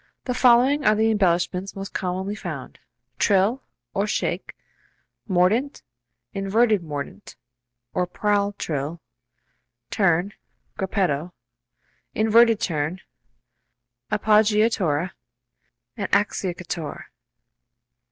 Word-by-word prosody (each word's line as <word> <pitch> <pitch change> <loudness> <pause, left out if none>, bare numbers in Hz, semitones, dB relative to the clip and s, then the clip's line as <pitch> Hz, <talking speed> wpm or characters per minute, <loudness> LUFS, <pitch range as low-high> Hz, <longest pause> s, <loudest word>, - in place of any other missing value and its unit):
The 250 - -1
following 255 +4 +4
are 215 - +4
the 220 +1 +2
embellishments 185 -1 0
most 195 0 -7
commonly 190 +2 -2
found: 170 -11 -7 0.4
Trill 205 +6 +3 0.3
(or 200 +2 0
shake), - - -2 0.7
mordent, 200 +10 +1 0.5
inverted 205 +2 +2
mordent 145 - -7 0.6
(or 180 - 0
prall 205 +2 0
trill), 155 -3 -4 0.9
turn 190 0 +2 0.4
(gruppetto), 180 -4 -1 0.8
inverted 225 0 +5
turn, 160 -2 -2 1.1
appoggiatura 210 -6 +2 0.8
and 200 - -4
acciaccatura. 175 -6 -2
195 Hz, 80 wpm, -23 LUFS, 175-215 Hz, 1.1 s, inverted